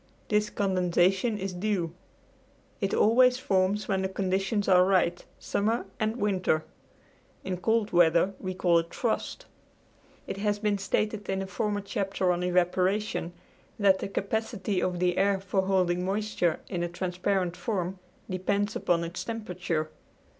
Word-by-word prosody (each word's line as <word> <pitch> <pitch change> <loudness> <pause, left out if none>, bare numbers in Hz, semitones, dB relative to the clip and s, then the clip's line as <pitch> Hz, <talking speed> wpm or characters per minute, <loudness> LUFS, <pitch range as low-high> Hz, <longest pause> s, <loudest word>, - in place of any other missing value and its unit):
This 210 0 +2
condensation 190 +2 +1
is 195 -1 -4
dew. 180 -3 -1 0.9
It 195 -2 -1
always 250 +3 +5
forms 195 -3 +1
when 190 -2 0
the 190 - -1
conditions 195 +2 -1
are 180 -1 +6
right, 180 -2 +2
summer 220 +3 -1
and 220 +1 0
winter. 190 -7 0 0.8
In 185 -1 -3
cold 220 +4 +1
weather 175 +2 +4
we 185 -1 -4
call 175 -2 +3
it 165 0 -6
frost. - - -2 0.8
It - - -5
has 205 0 0
been 205 -1 0
stated 210 +1 -1
in 195 0 0
a - - -5
former 205 +1 -2
chapter 195 -3 -1
on 175 0 -1
evaporation 180 +1 +1 0.4
that 195 -2 +4
the - - -3
capacity 200 -1 -2
of 180 -1 -1
the 180 0 +1
air 195 0 +3
for 195 0 0
holding 180 -2 +2
moisture 195 -3 0
in 180 -3 -3
a 175 - -1
transparent 180 0 -1
form 190 -5 -3 0.3
depends 200 +3 -1
upon 170 -1 +1
its 170 +2 -5
temperature. 180 -8 -3
190 Hz, 145 wpm, -28 LUFS, 180-205 Hz, 0.9 s, are